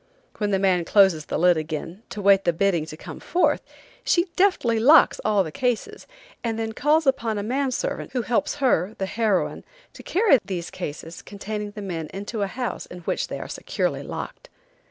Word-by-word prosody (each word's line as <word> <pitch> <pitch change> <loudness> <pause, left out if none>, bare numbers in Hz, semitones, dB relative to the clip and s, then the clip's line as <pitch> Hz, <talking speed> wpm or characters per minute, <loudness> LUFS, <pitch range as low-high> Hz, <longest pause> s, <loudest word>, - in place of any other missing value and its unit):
When 210 -1 0
the 195 - +2
man 190 -2 +2
closes 180 -4 +4
the - - -2
lid 175 +1 +4
again 160 +4 -5
to 205 - -6
wait 195 0 +5
the 175 - +2
bidding 170 -3 +1
to 155 - -8
come - - -9
forth, 355 - +1 0.4
she 345 0 +3
deftly 360 - +2
locks 290 +8 +6
all 210 -2 +3
the 160 - -6
cases, 250 - -2 0.4
and 225 -2 -1
then 225 0 -2
calls 300 +6 +2
upon 230 -5 +1
a 205 - -2
man 265 +5 0
servant 255 - -3
who 250 -2 0
helps 245 +7 0
her, 220 - +1
the 195 - -1
heroine, 210 -2 0 0.3
to - - -11
carry 380 - +4
these 180 -3 -5
cases 160 +3 -7
containing 210 +1 -6
men 180 -7 -5
into 205 +3 -5
a 200 - +1
house 245 +4 -4
in 180 - -10
which - - -2
they - - -5
are - - -6
securely - - -2
locked. - - -7
205 Hz, 190 wpm, -24 LUFS, 180-250 Hz, 0.4 s, locks